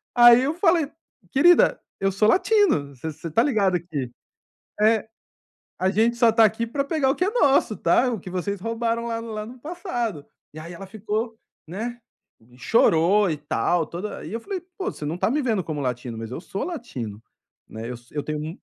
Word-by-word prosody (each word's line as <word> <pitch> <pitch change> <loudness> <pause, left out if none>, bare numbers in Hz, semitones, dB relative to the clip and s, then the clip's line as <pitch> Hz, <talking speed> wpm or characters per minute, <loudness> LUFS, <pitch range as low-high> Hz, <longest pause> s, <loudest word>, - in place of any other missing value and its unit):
Aí, 240 0 +8
eu 290 +4 0
falei: 335 -5 +2 0.4
"Querida, 350 - +5 0.2
eu 195 0 +1
sou 210 +3 +2
latino. 315 - +3
Você 160 +6 -5
você 160 +2 -8
está 225 +9 +2
ligada 200 -10 +2
que" 145 -8 -5 0.7
É. 220 0 +3 0.7
"A 185 - +2
gente 225 +4 +2
só 235 -1 +5
está 225 0 +5
aqui 220 +2 0
para 275 +4 -1
pegar 280 -2 0
o - - -2
que 360 - 0
é - - +1
nosso, 275 - +3
tá. 245 +10 +3
O 220 - -3
que 180 - -9
vocês 190 +2 -3
roubaram 230 +2 -2
lá 230 0 -3
no 230 -1 -7
lá 215 0 -4
no 245 +2 -11
passado". 240 - -4 0.3
E 155 - -9
aí 170 +2 -8
ela 195 +3 -9
ficou 220 +2 -3 0.3
né, 235 +7 -5 0.4
e 120 +2 -21
chorou 190 - +3
e 150 - -2
tal, 160 +3 0
toda 185 +5 -6
E - - -7
aí, - - -8
eu 230 - -2
falei: 395 -2 -4 0.2
"Pô, 380 - -2
você 150 - -8
não 155 +3 -2
está 200 - 0
me 300 +2 +1
vendo 220 -8 0
como 155 -2 -4
latino, 125 -2 -3
mas 115 0 -6
eu 155 - -5
sou 195 0 -5
latino, 125 - -6 0.5
né. 115 +2 -7
Eu 125 - -5
so 120 +3 -23
eu 145 - -1
tenho 150 -1 -3
m". 155 +2 -5
215 Hz, 210 wpm, -24 LUFS, 160-240 Hz, 0.7 s, Aí